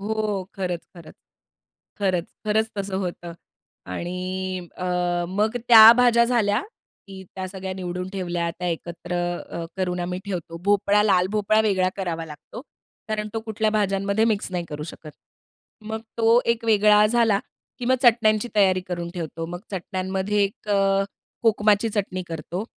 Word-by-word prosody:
हो 210 -1 -2
खरंच-खरंच. 175 -3 -6 0.8
खरंच, 185 -4 0 0.2
खरंच 220 +1 +1
तसं 195 -1 -2
होतं. 175 -2 -5 0.5
आणि 180 - -4
अ, 185 - -5 0.4
मग 210 +5 0
त्या 225 -1 +11
भाज्या 240 -1 +5
झाल्या, 235 -2 +1 0.4
की 190 -1 -10
त्या 185 0 -4
सगळ्या 190 0 -6
निवडून 180 0 -4
ठेवल्या, 175 -3 -2
त्या 180 +1 -4
एकत्र 170 +1 -5 0.4
अ, 170 - -4
करून 180 -1 -1
आम्ही 180 +1 -3
ठेवतो. 175 -4 -5
भोपळा, 205 0 +3
लाल 190 -4 +3
भोपळा 215 +1 +2
वेगळा 195 -4 +2
करावा 170 -4 -3
लागतो. 150 +8 -10 0.5
कारण 215 -1 -2
तो 225 - -1
कुठल्या 220 -1 -1
भाज्यांमध्ये 200 0 +1
मिक्स 215 -4 0
नाही 175 -1 -2
करू 150 -1 -6
शकत. 155 - -11 0.7
मग 220 +1 -5 0.2
तो 230 +1 +4
एक 235 0 -1
वेगळा 210 -1 +5
झाला 225 -2 +3 0.4
की 245 - -5
मग 255 +2 +3
चटण्यांची 225 -2 +4
तयारी 190 -3 +4
करून 175 -1 -5
ठेवतो. 165 -1 -5
मग 175 +1 -6
चटण्यांमध्ये 190 +2 -1
एक 200 +1 -7
अ, 195 -1 +2 0.4
कोकमाची 215 -1 +3
चटणी 200 -3 -2
करतो. 170 +4 -5
195 Hz, 145 wpm, -24 LUFS, 180-215 Hz, 0.8 s, त्या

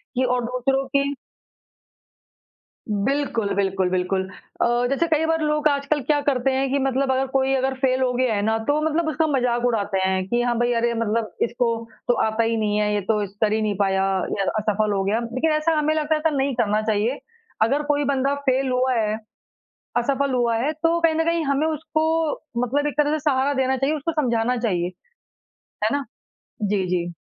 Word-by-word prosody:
कि 260 - +2
और 250 -1 +1
दूसरों 265 +2 0
की 280 0 0 1.8
बिल्कुल, 230 0 0
बिल्कुल, 190 -2 0
बिल्कुल। 185 +1 -1 0.3
अ, - - +4 0.2
जैसे 305 +5 +1
कई 320 0 +2
बार 325 0 +1
लोग 300 0 +1
आजकल 285 0 0
क्या 290 +3 +1
करते 270 -2 +1
हैं 265 0 0
कि 280 - +1
मतलब 270 0 +1
अगर 265 +1 +1
कोई 270 0 +1
अगर 265 0 0
फेल 260 -1 +1
हो 255 - +2
गया 250 -2 +1
है 200 - 0
ना, 220 +1 +1
तो 290 +7 0
मतलब 315 +1 0
उसका 315 +1 +1
मज़ाक 245 -4 +1
उड़ाते 205 -5 0
हैं 190 0 0
कि 240 +3 +1
हाँ, 240 -1 0
भाई 240 0 +2
अरे 235 0 +1
मतलब 225 -1 -1
इसको 235 0 0 0.4
तो 245 - +4
आता 220 +1 0
ही 225 0 0
नहीं 210 -1 0
है, 210 0 +1
ये 205 - 0
तो 210 +2 0
इस 200 0 -8
कर 210 -1 +3
ही 220 - +1
नहीं 210 -1 0
पाया 190 -1 +2 0.3
या 195 - 0 0.2
असफल 215 0 0
हो 195 - 0
गया। 210 +4 +1
लेकिन 255 +7 -1
ऐसा 305 +1 +1
हमें 305 +1 +2
लगता 310 0 +1
है 305 - -2
कि 295 - -3
नहीं 270 -1 0
करना 215 -2 +1
चाहिए, 220 +4 0 0.4
अगर 275 +7 +2
कोई 290 0 +1
बंदा 275 0 +1 0.2
फेल 260 +1 +1
हुआ 255 +1 +1
है, 215 -2 0 0.8
असफल 275 +2 +1
हुआ 240 -2 +1
है 275 +7 0
तो 330 +2 +1
कहीं 325 -1 +3
न 325 - +2
कहीं 335 -1 +1
हमें 280 +2 +1
उसको 315 0 -1 0.6
मतलब 290 +4 0
एक 290 - -2
तरह 295 0 +3
से 310 - 0
सहारा 270 +1 +1
देना 265 -1 +1
चाहिए, 280 +4 0
उसको 305 +3 -2
समझाना 240 0 +1
चाहिए। 180 -7 0 1.0
है - - +4
ना? 285 -1 -1 0.6
जी, 200 -2 +1
जी। 175 -1 -1
255 Hz, 205 wpm, -23 LUFS, 220-285 Hz, 1.8 s, अ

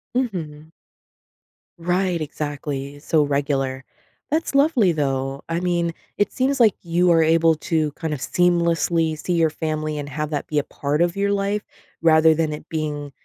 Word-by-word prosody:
Mhm. 160 - -3 1.1
Right, 180 0 0
exactly, 145 -2 -5
so 155 0 +2
regular. 140 -2 -1 0.5
That's 315 +1 -1
lovely, 275 - +4
though. 135 -3 -2
I 165 - 0
mean, 175 -2 0 0.2
it 205 - +1
seems 270 +1 0
like 220 -5 +5
you 175 +1 +2
are 165 -1 +5
able 165 0 +4
to 155 -1 -1
kind 160 -2 -4
of 145 - -4
seamlessly 170 -1 +1
see 180 - -2
your 165 -2 +3
family 155 0 -3
and 145 -1 -5
have 150 +2 -3
that 145 - -3
be 150 - +1
a - - -1
part 145 +2 -2
of 175 0 +2
your 200 0 +1
life, 200 +1 0 0.4
rather 160 -1 +6
than 155 -1 0
it 150 +1 -8
being 150 -2 -3
160 Hz, 165 wpm, -22 LUFS, 150-175 Hz, 1.1 s, rather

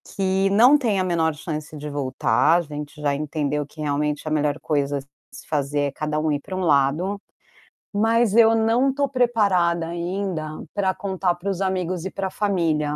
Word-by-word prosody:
que 190 0 +1
não 245 +8 +6
tem 225 -8 0
a - - +2
menor 165 -3 +1
chance 155 0 -6
de 150 +1 -6
voltar. 140 +2 +2
A - - -1
gente 150 -1 -8
já 145 -1 +1
entendeu 150 0 -2
que 155 +2 -12
realmente 150 +1 -1
a - - -2
melhor 150 0 0
coisa 145 -2 0
a - - -8 0.3
se - - -12
fazer 145 -1 -1
é 140 -1 0
cada 150 +1 -2
um 155 0 0
ir 145 - 0
pra 190 - -7
um 185 - -2
lado, 160 +5 +1 0.7
mas 225 +1 +2
eu 225 -1 +6
não 230 +4 +2
tô 280 +1 0
preparada 200 -10 +2
ainda 170 -2 -4
pra 190 -2 +1
contar 190 -3 -1
para 175 +3 -5
os 195 -1 -2
amigos 185 -2 -1
e 190 - -4
pra 195 -1 -3
família. 165 -8 0
170 Hz, 190 wpm, -23 LUFS, 150-195 Hz, 0.7 s, não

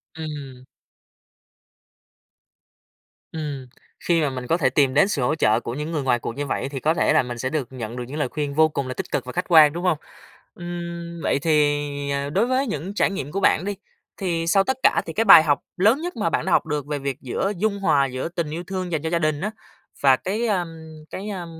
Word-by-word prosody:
Ừm. 145 -5 -7 2.7
Ừm, 145 -5 -5 0.3
khi 170 -2 +1
mà 150 - +1
mình 125 -2 -6
có 165 - +2
thể 140 -7 +2
tìm 135 0 +2
đến 150 +7 +5
sự 180 -9 -1
hỗ 125 +5 +1
trợ 110 -7 +3
của 120 - -5
những 150 +4 -4
người 150 -4 -2
ngoài 125 -2 +2
cuộc 115 - -5
như 145 +1 -3
vậy, 135 - -2
thì 140 -1 -5
có 155 +5 +2
thể 165 - +2
là 155 - +4
mình 120 -1 -6
sẽ 130 +2 -2
được 145 -5 -2
nhận 120 -3 -6
được 125 - -4
những 145 +4 -6
lời 150 - 0
khuyên 145 0 -3
vô 155 +1 +5
cùng 140 -3 -3
là 130 - -3
tích - - -6
cực - - -1
và 125 - -6
khách 180 - -1
quan, 155 -3 +7
đúng 175 +2 -5
hông? 180 -4 +2 0.6
Ừm, 170 -1 -6
vậy - - +1
thì, 150 -2 +3 0.3
à, 140 0 -1
đối 195 +10 +1
với 260 +2 +1
những 185 0 -4
trải - - +2
nghiệm 145 -7 -5
của 195 - -2
bạn 185 -2 +3
đi, 205 0 -2 0.4
thì 170 -4 -2
sau 195 +3 +4
tất 265 +4 -1
cả - - +4
thì 165 - -6
cái 225 +5 +1
bài 160 - +10
học 145 -3 +2 0.2
lớn 220 - +3
nhất 355 +1 -4
mà - - 0
bạn - - -1
đã - - -1
học - - +3
được 150 -2 -2
về 145 -1 -2
việc 135 -1 -3
giữa 165 +10 -2
dung 200 +1 0
hòa 150 -8 +3
giữa 130 +3 -4
tình 170 -3 -3
yêu 165 +3 -5
thương 185 0 -4
dành 160 -3 -1
cho 160 - -2
gia 170 0 +1
đình 155 -2 0
á, 210 +3 -2 0.5
và 135 -2 +7
cái, 210 - -2
a, 190 -5 +1 0.4
cái, 200 +3 -6
a, 185 -4 -5
155 Hz, 240 wpm, -23 LUFS, 140-175 Hz, 2.7 s, bài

